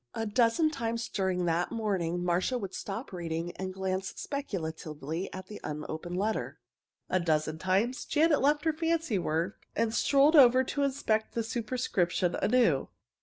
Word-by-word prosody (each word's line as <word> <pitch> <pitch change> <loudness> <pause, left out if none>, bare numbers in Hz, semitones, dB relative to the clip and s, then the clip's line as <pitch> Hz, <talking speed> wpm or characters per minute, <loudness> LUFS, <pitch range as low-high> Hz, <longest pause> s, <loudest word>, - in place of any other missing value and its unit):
A 225 - -2
dozen 235 +8 +3
times 230 -5 -2
during 185 -2 0
the 170 +1 +1
morning 185 -6 -1
Marcia 180 +8 +1
would 195 -5 -5
stop 205 +3 -5
reading 170 -1 -3
and 190 0 -4
glance 190 0 -3
speculatively 160 - -4
at 185 -1 -7
the 210 +2 -10
unopened 155 +3 -5
letter. 215 +3 -2 0.5
A 185 - +1
dozen 155 -2 0
times 195 +8 +1
Janet 310 0 +3
left 295 +3 +2
her 320 - +3
fancy 325 - 0
work 170 +3 -2
and 225 0 +1
strolled 280 +6 +4
over 255 -2 +7
to 285 +2 -3
inspect 260 -6 0
the 230 - 0
superscription 215 -7 0
anew. 230 - +2
200 Hz, 150 wpm, -30 LUFS, 175-255 Hz, 0.5 s, over